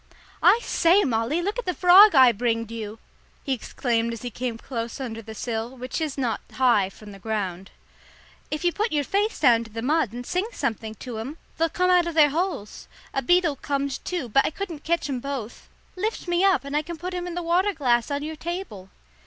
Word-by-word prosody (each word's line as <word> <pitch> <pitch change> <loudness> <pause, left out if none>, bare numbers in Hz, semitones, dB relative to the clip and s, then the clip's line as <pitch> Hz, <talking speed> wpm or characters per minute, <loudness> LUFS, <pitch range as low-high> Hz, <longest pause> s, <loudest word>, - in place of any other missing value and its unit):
"I 460 - +6
say, 365 +4 +4
Molly, 250 +7 0
look 410 +6 -2
at 485 - -6
the 360 - 0
frog 370 +1 +8
I 260 -2 +8
bringed 230 0 -1
you!" 220 -1 -6 0.5
he 275 - -1
exclaimed 235 -1 -1
as 230 - -8
he 245 - -4
came 240 +1 -4
close 230 -1 -5
under 230 -4 -5
the 220 0 -10
sill, 235 +2 -4
which 255 +6 -4
is 305 -3 -2
not 240 -5 -1
high 240 -7 +3
from 205 +1 -13
the 195 - -12
ground. 195 -3 -3 0.8
"If 305 +3 -3
you 350 - +3
put 430 +2 -1
your 295 -1 +1
face 410 +8 0
down 235 -5 +5
to - - -12
the 225 +1 -6
mud 300 -4 +1
and 245 +1 -7
sing 365 - -1
something 220 -1 -3
to 235 -1 -7
'em, 270 +8 -6 0.2
they'll 330 0 +2
come 365 +2 +1
out 355 -1 +4
of 335 - -4
their 295 -3 +6
holes. 330 - -3 0.3
A 270 - 0
beetle 340 0 +2
comed, 280 0 -2
too, 350 -8 -3
but 275 +5 +3
I - - 0
couldn't 330 -2 -6
ketch 340 -1 0
'em 265 -3 -2
both. 260 -4 -6 0.3
Lift 420 +1 -3
me 350 +1 +1
up, 390 -5 +4
and 280 +1 -4
I 300 - +3
can 335 +2 -7
put 360 +3 -5
him 355 0 -3
in 345 - -5
the 355 - -3
waterglass 330 - +1
on 285 0 -2
your 315 +1 -5
table." 320 - -6
275 Hz, 220 wpm, -25 LUFS, 230-345 Hz, 0.8 s, frog